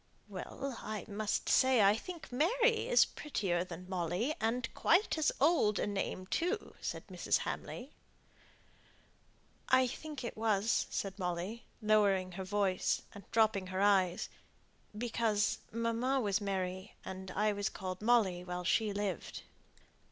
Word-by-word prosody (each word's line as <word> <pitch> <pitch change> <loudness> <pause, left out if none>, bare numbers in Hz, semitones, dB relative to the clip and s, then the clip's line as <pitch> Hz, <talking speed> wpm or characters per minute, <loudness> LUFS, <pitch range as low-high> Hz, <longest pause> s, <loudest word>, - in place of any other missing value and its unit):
"Well, 270 -3 -6
I 215 -1 -5
must 210 0 -2
say 260 -4 +5
I 200 +1 +6
think 335 +7 -8
Mary 450 - +2
is - - +6
prettier 190 - -2
than 180 0 -9
Molly, 185 - -1
and 230 +2 0
quite 370 +6 +3
as 315 -2 +2
old 275 -8 +4
a - - 0
name, 195 -2 -3
too," 355 - -1
said - - -4
Mrs. - - 0
Hamley. 255 +4 -5 1.8
"I 260 0 +6
think 290 +2 -6
it 235 - -4
was," 215 0 +1
said 195 0 -3
Molly, 180 +5 -3 0.2
lowering 200 -3 +3
her 190 +2 -5
voice, 190 -1 0
and 200 -2 -12
dropping 220 -4 +3
her 185 +1 -2
eyes, 190 -3 +3 0.7
"because 220 -2 +1
mamma 230 +4 0
was 210 -3 +1
Mary, 190 -1 -3
and 190 0 -6
I 210 +3 +1
was 205 0 -1
called 185 0 -6
Molly 210 -6 +3
while 180 0 -4
she 215 +4 +2
lived." 200 -4 -3
210 Hz, 135 wpm, -34 LUFS, 190-245 Hz, 1.8 s, I